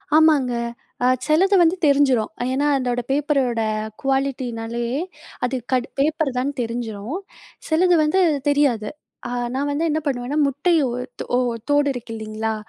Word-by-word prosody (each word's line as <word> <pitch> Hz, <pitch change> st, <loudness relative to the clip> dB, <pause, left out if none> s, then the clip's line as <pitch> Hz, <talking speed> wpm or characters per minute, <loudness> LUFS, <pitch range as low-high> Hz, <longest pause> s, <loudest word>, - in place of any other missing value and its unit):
ஆமாங்க. 300 Hz, -6 st, +4 dB, 0.5 s
அ -, -, +4 dB, 0.2 s
சிலது 380 Hz, +6 st, +3 dB
வந்து 340 Hz, +1 st, +4 dB
தெரிஞ்சிரும். 275 Hz, -6 st, +3 dB, 0.2 s
ஏன்னா, 285 Hz, +2 st, +1 dB
அதோட 245 Hz, -2 st, -1 dB
பேப்பரோட 275 Hz, -5 st, +1 dB, 0.4 s
குவாலிட்டினாலே, 245 Hz, -4 st, -1 dB, 0.6 s
அது 260 Hz, +1 st, -2 dB, 0.2 s
கடு 255 Hz, -1 st, +1 dB
பேப்பர்தான்னு 285 Hz, -3 st, 0 dB
தெரிஞ்சிரும். 230 Hz, -, -4 dB, 0.5 s
சிலது 350 Hz, +2 st, +3 dB
வந்து 310 Hz, +6 st, +2 dB, 0.3 s
தெரியாது. 260 Hz, -7 st, +2 dB, 0.4 s
அ -, -, -5 dB, 0.3 s
நான் 285 Hz, +2 st, -1 dB
வந்து 310 Hz, +4 st, 0 dB
என்ன 310 Hz, +1 st, +1 dB
பண்ணுவேன்னா, 265 Hz, +1 st, -2 dB
முட்டை 290 Hz, +6 st, +1 dB
ஓ -, -, -2 dB, 0.3 s
தோ 245 Hz, -, -1 dB, 0.3 s
ஓடு 290 Hz, 0 st, +3 dB
இருக்கு 240 Hz, -2 st, -8 dB
இல்லீங்களா? 220 Hz, 0 st, -3 dB
270 Hz, 130 wpm, -22 LUFS, 240-295 Hz, 0.6 s, ஆமாங்க